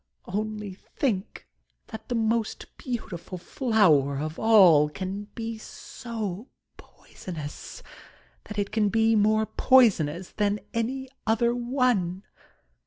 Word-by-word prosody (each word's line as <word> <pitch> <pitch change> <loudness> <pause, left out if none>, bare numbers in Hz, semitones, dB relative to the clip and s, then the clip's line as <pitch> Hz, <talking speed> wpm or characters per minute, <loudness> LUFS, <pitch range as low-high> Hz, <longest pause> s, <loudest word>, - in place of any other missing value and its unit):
Only 210 0 -4
thinks 200 +1 -3 0.5
that 220 - -9
the 245 - -1
most 225 0 -1
beautiful 195 -8 -6
flower 175 - +2
of 155 +2 -5
all 185 -10 +6
can 190 +7 -5
be 225 -1 -5
so 220 -2 -7 0.3
poisonous 165 - -9 0.3
— - - -32
^that 210 - -8
it 200 -1 -1
can 215 -1 +2
be 225 +1 +3
more 215 +1 +3
poisonous 190 - +3
than 205 0 0
any 260 +4 -2 0.2
other 235 +2 +2
one 240 -7 0
215 Hz, 110 wpm, -26 LUFS, 185-230 Hz, 0.5 s, all